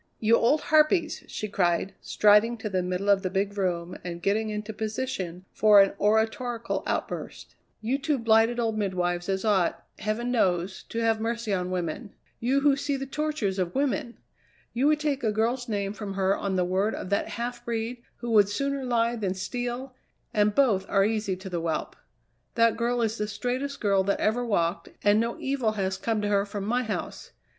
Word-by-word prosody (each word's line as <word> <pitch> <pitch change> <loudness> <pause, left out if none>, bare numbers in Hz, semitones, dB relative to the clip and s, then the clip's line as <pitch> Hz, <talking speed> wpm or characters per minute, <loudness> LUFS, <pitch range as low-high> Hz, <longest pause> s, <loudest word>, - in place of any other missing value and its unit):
"You 225 +1 +4
old 265 +7 +3
harpies!" 315 +2 +2
she 215 - -4
cried, 185 -1 0
striding 210 +3 +4
to 220 -1 -4
the 185 -2 0
middle 180 +2 -2
of 200 -1 +4
the 185 - -2
big 200 +2 -1
room 180 -3 -2
and 170 -1 -5
getting 210 +4 0
into 210 +1 -4
position 210 -5 -4
for 210 -1 +6
an 195 0 +5
oratorical 225 +3 0
outburst. - - -4 0.3
"You 250 +5 0
two 295 0 0
blighted 225 0 +3
old 225 -2 0
midwives 175 -2 -1
as 190 +2 -1
ought, 195 -5 +1
heaven 215 +3 -2
knows, 185 -5 +1
to - - -6
have 225 -1 +1
mercy 230 -1 -2
on 180 -1 -1
women; 185 +4 -4 0.2
you 265 +4 +1
who 285 -1 +4
see 280 0 -2
the 270 - -4
tortures 270 -9 -2
of 180 -1 -2
women! 245 -4 -1 0.6
You 255 +4 +2
would 305 0 +3
take 290 -3 -1
a 220 - +2
girl's 235 +3 -1
name 200 -2 -1
from 205 -2 -6
her 195 0 +2
on 195 -1 -2
the 180 -1 +2
word 190 +4 0
of 185 - -6
that 200 - +1
half 240 0 -4
breed, 235 +1 -3 0.2
who 240 -1 -5
would 205 -3 +5
sooner 275 +5 -2
lie 235 -1 +1
than 195 -5 -2
steal 245 +6 -4 0.4
and 210 -1 +2
both 225 -9 +3
are 195 -1 +3
easy 215 -3 -1
to 190 +1 -10
the 175 -3 -3
whelp. 165 -1 -2 0.6
That 230 -1 +4
girl 240 +1 0
is 225 0 -1
the 210 - -1
straightest 255 +6 -3
girl 195 -2 +2
that 200 - 0
ever 230 +3 +1
walked, 180 -5 0
and 205 +1 +5
no 230 +1 -1
evil 265 -5 0
has 190 -2 -1
come 220 -2 -1
to - - 0
her 200 -1 +2
from 200 -1 -5
my 245 +4 +1
house. 220 -4 -5
215 Hz, 195 wpm, -27 LUFS, 195-240 Hz, 0.6 s, for